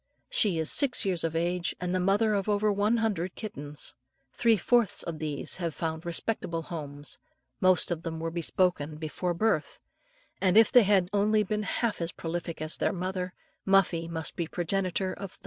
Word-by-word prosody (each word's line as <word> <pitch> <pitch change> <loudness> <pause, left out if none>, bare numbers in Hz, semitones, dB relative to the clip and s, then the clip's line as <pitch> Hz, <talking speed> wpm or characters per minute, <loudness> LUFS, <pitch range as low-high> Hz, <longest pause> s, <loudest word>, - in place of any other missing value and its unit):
She 200 -7 +2
is 160 -1 +1
six 260 -6 +5
years 180 -4 0
of 165 -1 -2
age, 175 +2 0
and 180 0 -2
the 185 - +1
mother 205 +4 +2
of 200 0 -1
over 205 0 +2
one 210 +4 +2
hundred 195 -6 -1
kittens. 150 -9 -6 0.4
Three 230 -2 +3
fourths 235 0 +2
of 165 -2 -5
these 150 -2 -1
have 170 -4 -3
found 160 +1 -4
respectable 170 -2 -2
homes, 145 -3 -4 0.4
most 185 -1 +4
of 165 -2 -2
them 160 -1 -5
were 165 0 -3
bespoken 170 -2 0
before 165 +3 -3
birth, 215 -5 0 0.6
and 190 +1 +3
if 225 - +7
they 250 - +8
have 190 -3 +3
only 210 +1 +3
been 210 +2 -2
half 210 0 -1
as 170 0 -1
prolific 165 -1 -5
as 155 - -1
their - - 0
mother, 185 0 -3 0.3
Muffie 185 -4 +3
must 165 -1 -3
be 170 - -2
progenitor 185 +2 -1
of 195 -2 -8
thousands. - - -19
180 Hz, 180 wpm, -28 LUFS, 165-205 Hz, 0.6 s, they